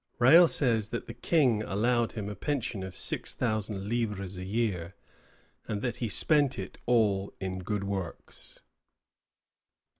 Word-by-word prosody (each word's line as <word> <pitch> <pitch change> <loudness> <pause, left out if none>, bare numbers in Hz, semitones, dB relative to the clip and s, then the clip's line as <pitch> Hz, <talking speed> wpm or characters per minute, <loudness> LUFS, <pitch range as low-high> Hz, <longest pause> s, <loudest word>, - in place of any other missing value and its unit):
Rale 160 +8 +7
says 115 -9 +1
that 120 - -4
the 115 - -8
King 120 -2 +2
allowed 115 +3 0
him 105 -3 -5
a 105 - -4
pension 115 -2 -3
of 95 -1 -7
six - - -1
thousand 110 -4 -2
livres 105 -5 -2
a 90 - -6
year, 95 -4 -2 0.7
and 105 -1 -3
that 120 -3 -2
he 115 - -2
spent 145 +2 +3
it - - -7
all 105 -5 +2
"in 95 -1 -4
good 100 +2 -3
works." 95 -4 -6
110 Hz, 145 wpm, -29 LUFS, 100-120 Hz, 0.7 s, Rale